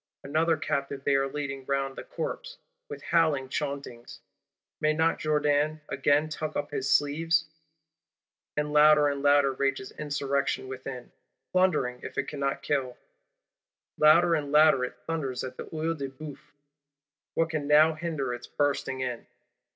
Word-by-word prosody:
Another 160 +3 +1
captive 140 -2 -3
they 140 - +2
are 135 0 +1
leading 135 -2 -4
round 135 -1 -1
the - - -7
corpse, - - -5 0.3
with 445 - -8
howl 165 -4 +3
chauntings: 140 -5 -5 0.6
may 155 0 +2
not 160 +1 +1
Jourdan 150 0 +1
again 145 +3 +2
tuck 155 0 -5
up - - -3
his 135 -2 -2
sleeves? 165 +3 +2 1.1
And 150 0 -1
louder 150 0 +6
and 140 -1 -3
louder 145 -1 +4
rages 135 -1 -2
Insurrection 140 -2 -2
within, 130 -1 -7 0.4
plundering 150 -10 +1
if - - -9
it - - -1
cannot 140 -2 -3
kill; 130 -4 -1 1.0
louder 165 +3 +5
and 145 -3 -1
louder 150 -3 +5
it - - -9
thunders 140 -6 -3
at 130 0 -6
the - - -6
Œil 160 +1 -2
de 140 -3 -5
Bœuf: 145 +2 -9 1.0
what 165 0 +1
can 150 -3 -2
now 155 +2 +6
hinder 155 -6 -3
its 120 0 -8
bursting 140 -2 -1
in? 125 -2 -4
145 Hz, 145 wpm, -28 LUFS, 135-155 Hz, 1.1 s, louder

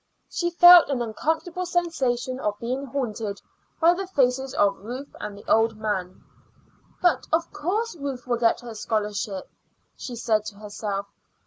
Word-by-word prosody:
She 345 - 0
felt 350 -1 +9
an 275 -3 0
uncomfortable 320 +10 -2
sensation 265 -8 -1
of 210 -5 -2
being 255 +5 -3
haunted 225 -6 -3 0.4
by 335 +1 +6
the 380 +2 -4
faces 265 -5 +1
of 200 -1 +2
Ruth 250 +7 -8
and 210 -1 -6
the 205 - -13
old 225 0 +3
man. 200 -4 -3 0.8
"But 355 - +3
of 325 +1 0
course 415 +7 -2
Ruth 275 -5 -5
will 245 -1 0
get 230 -1 +2
her 240 -2 -8
scholarship," 210 -3 -2 0.5
she 245 - -7
said 220 -2 +1
to 210 - -7
herself. 205 -1 -4
245 Hz, 150 wpm, -25 LUFS, 210-320 Hz, 0.8 s, felt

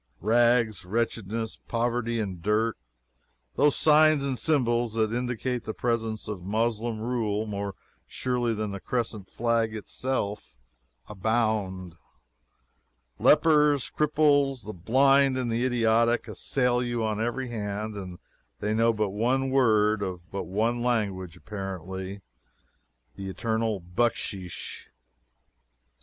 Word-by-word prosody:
Rags, 115 +1 +3
wretchedness, 110 +2 -2
poverty 120 0 -1
and 95 -5 -4
dirt, 110 +4 +1 0.8
those 145 - +4
signs 155 -1 +5
and 135 -2 -1
symbols 120 -6 +1
that 110 0 +1
indicate 125 0 -2
the 110 - -5
presence 115 -2 -1
of 105 -4 -5
Moslem 110 +3 -1
rule 110 -2 -1
more 100 -2 -4 0.3
surely 120 -2 -1
than 105 -1 -3
the 100 - -5
crescent 110 -4 -3
flag 115 -1 0
itself, 105 - -3 0.5
abound. 105 -4 -1 1.2
Lepers, 150 -3 +4
cripples, 145 -5 +2
the 110 - -6
blind, 135 +8 +4
and 125 -2 -1
the 115 +2 0
idiotic, 115 -1 +2
assail 125 +2 0
you 120 -2 -1
on 110 0 -1
every 120 +2 -2
hand, 105 -1 -4
and 90 -3 -7 0.4
they 105 +1 -1
know 115 +1 +3
but 105 -2 -1
one 125 +6 0
word 110 -5 +3
of 90 -3 -5
but 100 - -4
one 115 +5 0
language 100 -8 -1
apparently 95 0 -6 0.9
the 95 -1 -5
eternal 110 +1 -1
"bucksheesh." 95 -1 -3
115 Hz, 115 wpm, -27 LUFS, 105-120 Hz, 1.2 s, signs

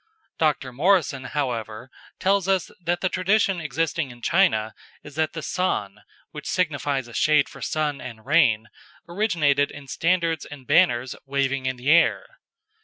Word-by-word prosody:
Dr. 145 -5 0
Morrison, 145 -3 +2
however, 125 -3 -4 0.3
tells 195 -1 +1
us 190 -2 +1
that 175 +1 -1
the 185 - +2
tradition 190 0 +1
existing 155 0 -1
in 120 -1 -14
China 110 - +2 0.3
is, 150 - -11
that 155 +1 -1
the 160 - -6
San, 105 - -2 0.3
which - - -8
signifies 135 -4 -1
a 120 - -13
shade 150 +2 +3
for - - -13
sun 150 -2 -2
and 115 -2 -9
rain, 130 -8 +3 0.4
originated 170 -7 +1
in 145 -1 -11
standards 165 0 0
and 140 -3 -11
banners 120 +1 +3
waving 135 -1 -1
in 130 - -1
the 125 +4 0
air. 170 +1 +4
145 Hz, 150 wpm, -24 LUFS, 130-170 Hz, 0.4 s, air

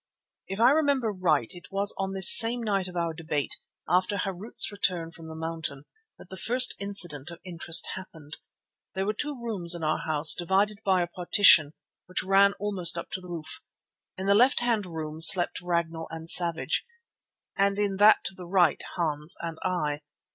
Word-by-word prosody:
If 195 +2 -7
I 240 +3 +5
remember 280 -6 0
right 165 - -1
it 175 - -15
was 200 +1 +1
on 195 0 -4
this 190 -1 +8
same 235 +1 +6
night 195 -4 -2
of 180 - -11
our 170 -1 -3
debate, 155 -3 -5 0.3
after 185 +3 0
Harût's 195 +4 -4
return 180 -5 -1
from 165 -1 -13
the 160 - -10
mountain, 160 -3 -6 0.3
that - - -16
the 190 - -8
first 250 +5 +2
incident 175 -7 0
of 170 -1 -11
interest 170 -2 -2
happened. 160 -5 -12 0.6
There 190 0 -3
were 210 - -2
two 290 +4 -6
rooms 195 -8 0
in 170 - -8
our 155 0 -1
house 155 -1 +3
divided 195 +4 -1
by 190 -2 +1
a - - -5
partition 175 -3 +4 0.3
which 185 0 -3
ran 195 +1 +3
almost 195 -4 +1
up - - -8
to 185 - -5
the 180 - -13
roof. 160 -2 -7 0.6
In 190 - -6
the 200 - +3
left 245 +6 +3
hand 230 -5 -1
room 160 -2 -8
slept 175 +2 +5
Ragnall 170 -2 -3
and 165 0 -9
Savage, 170 -1 +2 0.7
and 200 0 0
in 200 -2 -2
that 210 +2 +4
to - - -4
the 180 -2 -11
right 175 -4 +1
Hans 155 -2 -4
and 165 -1 -7
I. 150 -5 -3
180 Hz, 185 wpm, -25 LUFS, 165-200 Hz, 0.7 s, this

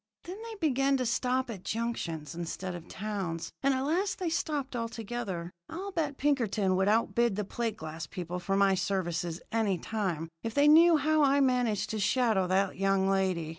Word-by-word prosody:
Then 370 +5 -8
they 455 -1 -7
began 275 -6 +2
to 255 - -1
stop 250 +2 0
at 190 -5 -8
junctions 175 -10 -3
instead 175 +2 -4
of 175 -1 -8
towns, 190 -5 -4
and 275 - +3
at 260 - -1
last 360 +7 0
they 360 -3 -1
stopped 285 -5 -2
altogether. 225 -6 -4 0.2
I'll 375 +5 -5
bet 300 -6 -2
Pinkerton 220 -9 +1
would 190 +1 +2
outbid 230 0 +2
the 210 - -1
plate 225 +1 -3
glass 160 0 -6
people 180 0 -5
for 195 +2 -1
my 195 -1 +4
services 175 -3 -2
any 220 -4 +1
time 175 -5 -3
if 225 -1 -5
they 285 +1 +5
knew 325 +2 +7
how 310 +2 +2
I 280 0 +4
managed 250 -6 +1
to 220 - -2
shadow 210 -3 +2
that 190 +1 +1
young 195 0 +2
lady. 185 -4 0
220 Hz, 180 wpm, -30 LUFS, 185-270 Hz, 0.2 s, knew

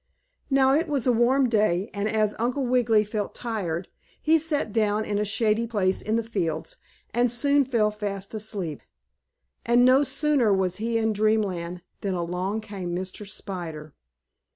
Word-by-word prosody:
Now, 270 -1 +4
it 325 +4 +2
was 280 -6 -1
a 250 - +4
warm 250 +3 +3
day, 210 -3 +1
and, 200 +1 -1
as 215 -1 +1
Uncle 250 +4 0
Wiggily 240 -4 +3
felt 210 -1 -4
tired, 190 -7 -3 0.3
he 320 +1 +3
sat 295 -9 -1
down 215 -1 +1
in 205 -1 -1
a - - +1
shady 215 +2 +1
place 195 -4 0
in 215 - -1
the 230 - +1
fields, 170 -8 -3 0.4
and 240 +1 +2
soon 280 +3 +3
fell 225 -5 +1
fast 200 -2 -5
asleep. 200 -8 -4 0.8
And, 240 +1 +4
no 260 +3 +6
sooner 275 -4 +1
was 190 -2 +1
he 230 +1 -1
in 220 -1 +1
Dreamland 195 -5 0 0.2
than 195 -2 -2
along 180 +5 -2
came 195 -5 -5
Mr. 185 +3 -5
Spider. 165 -7 -6
215 Hz, 160 wpm, -25 LUFS, 195-240 Hz, 0.8 s, no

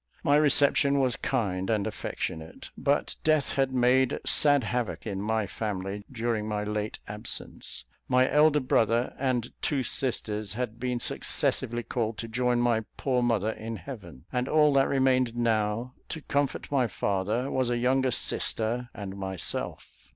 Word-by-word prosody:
My 145 - +4
reception 140 -1 +4
was 130 -4 +3
kind 95 -7 -1
and 105 -3 +1
affectionate; 80 0 -5
but - - 0
death 155 -3 +2
had 135 -1 +1
made 130 0 +3
sad 145 -3 +3
havoc 120 +1 -2
in 100 -3 -3
my 110 +1 0
family 100 -1 -4
during 115 -3 -1
my 105 -1 -1
late 105 0 -3
absence. 105 +2 -5 0.2
My 130 0 +4
elder 150 +1 +5
brother 115 -1 +2
and 130 -3 -1
two 140 -3 0
sisters 110 -6 -2
had 115 -1 -4
been 125 -1 -1
successively 120 0 0
called 115 -2 -2
to 115 - -5
join 125 +1 +1
my 120 -2 +2
poor 130 -2 +1
mother 110 -3 +1
in 110 +1 -6
heaven, 85 - -9
and 125 +1 0
all 150 -2 +5
that 135 -1 +4
remained 130 -3 +2
now 115 +1 0 0.2
to 160 - -5
comfort 145 0 -1
my 130 -4 +3
father 105 +6 -1
was 130 -2 +1
a 120 - +1
younger 130 +2 +2
sister 120 0 -1
and 100 -2 -6
myself. 95 -4 -4
120 Hz, 150 wpm, -28 LUFS, 105-130 Hz, 0.2 s, elder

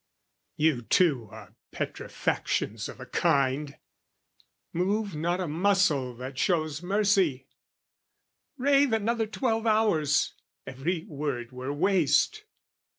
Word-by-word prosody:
You 150 -5 +2
too 135 -2 +2
are - - -12 0.2
petrifactions 110 +1 -2
of - - -10
a 130 - -8
kind: 140 -1 0 1.0
Move 200 +3 0
not 170 +4 -1
a 180 - -2
muscle 160 -6 +1
that 130 +2 -7
shows 155 -4 0
mercy; 190 -8 +1 1.1
rave 275 -1 +3
Another 225 +1 0
twelve 225 0 -1
hours, 205 -10 +2 0.3
every 160 +6 -3
word 140 -5 -4
were 130 +2 -5
waste! 185 - +2
165 Hz, 100 wpm, -27 LUFS, 140-205 Hz, 1.1 s, rave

